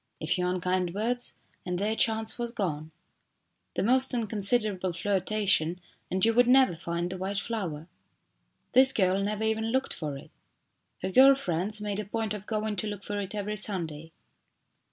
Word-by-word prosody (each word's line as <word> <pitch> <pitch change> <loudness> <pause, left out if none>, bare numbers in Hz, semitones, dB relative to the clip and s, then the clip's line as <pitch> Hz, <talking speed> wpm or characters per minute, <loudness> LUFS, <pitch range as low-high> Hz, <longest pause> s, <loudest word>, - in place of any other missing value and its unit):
A - - -5
few 180 +2 0
unkind 180 0 -1
words 245 +4 -2 0.3
and 180 -1 -3
their 210 +4 -1
chance 220 0 0
was 240 0 -2
gone. 160 -9 -3 0.9
The - - 0
most 255 +4 +3
in 235 -2 0
considerable 205 -3 +1
flirtation 190 -2 0 0.3
and 185 +3 +3
you 230 - +3
would 245 +1 +4
never 255 -7 +5
find 170 +1 -3
the 185 - -6
white 195 +2 -3
flower. 180 -8 -4 0.8
This 265 +1 +7
girl 190 -4 +2
never 210 +2 -2
even 220 0 0
looked 260 +4 -1
for 150 -4 -5
it. - - -14 0.7
Her 190 - -2
girl 270 +6 +7
friends 205 -2 -2
made 205 -1 -3
a 210 - -4
point 220 +1 -3
of 210 -1 -8
going 215 -1 -2
to 215 - -2
look 205 -1 -6
for 205 0 -4
it 200 +1 -5
every 210 +1 -3
Sunday. 165 -6 -1
205 Hz, 175 wpm, -28 LUFS, 180-220 Hz, 0.9 s, This